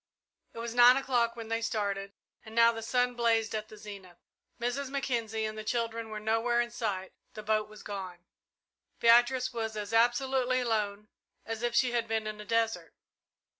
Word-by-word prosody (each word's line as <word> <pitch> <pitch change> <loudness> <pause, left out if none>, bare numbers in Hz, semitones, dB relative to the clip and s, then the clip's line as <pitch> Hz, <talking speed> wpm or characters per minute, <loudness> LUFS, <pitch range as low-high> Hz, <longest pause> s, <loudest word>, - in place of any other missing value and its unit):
It - - -14
was 230 0 -4
nine 245 +1 +7
o'clock 245 -4 +1
when 225 -1 -8
they 225 0 -1
started, 200 -3 -2 0.3
and 220 -1 -11
now 230 0 +6
the 225 -1 -6
sun 245 +2 +1
blazed 230 -2 +1
at 215 0 -3
the 215 - -12
zenith. 200 -4 -11 0.4
Mrs. 250 +3 -2
Mackenzie 230 -5 -2
and 215 0 -4
the 215 - -6
children 230 0 -2
were 215 0 -5
nowhere 225 +3 +1
in 240 0 0
sight 200 -5 -3 0.2
the 215 - -7
boat 215 0 0
was 215 -1 -13
gone. 185 -3 -7 0.7
Beatrice 245 +2 +4
was 220 -2 -3
as 210 +1 -5
absolutely 255 +2 +2
alone 210 -3 -1 0.4
as 225 0 -4
if 240 -1 -1
she 250 0 +3
had 235 -1 0
been 220 -1 -1
in 215 0 -5
a - - -10
desert. 225 +1 -1
225 Hz, 180 wpm, -30 LUFS, 215-240 Hz, 0.7 s, nine